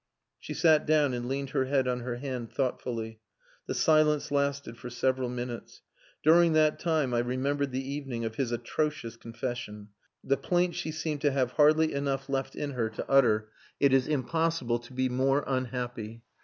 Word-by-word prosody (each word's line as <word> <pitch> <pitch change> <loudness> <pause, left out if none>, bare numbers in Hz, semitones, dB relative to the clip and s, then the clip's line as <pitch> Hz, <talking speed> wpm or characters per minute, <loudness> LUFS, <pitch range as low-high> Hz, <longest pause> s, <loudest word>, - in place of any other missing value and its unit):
She - - -7
sat 155 -3 +4
down 150 -3 +3
and 120 0 -3
leaned 135 +1 -3
her 130 - +1
head 135 -1 +1
on 125 -1 0
her 120 0 -4
hand 125 -2 -5
thoughtfully. 115 -4 -3 0.5
The - - -2
silence 155 -2 +3
lasted 140 -3 -1
for 125 +1 -8
several 130 +1 0
minutes. 120 -1 -6 0.4
During 165 +1 +6
that 155 -1 +3
time 155 -7 0
I 120 - +2
remembered 135 +3 -1
the 130 +1 -3
evening 135 -5 -4
of 110 - -3
his 125 0 -2
atrocious 120 +1 -2
confession 115 -3 -6 0.3
the 140 - +1
plaint 175 0 +1
she 160 - -3
seemed 155 -2 -3
to 145 - +3
have 130 -2 0
hardly 155 +2 +4
enough 140 -1 -1
life 135 - -22
left 135 -1 -2
in 145 - -3
her 120 -4 -1
to 110 - -6
utter, 110 -5 +3 0.3
"It 140 -2 +4
is 135 -1 +3
impossible 155 -3 0
to 120 +2 -15
be 130 0 +1
more 135 +3 +1
unhappy...." 120 -3 -3
130 Hz, 180 wpm, -29 LUFS, 120-145 Hz, 0.5 s, During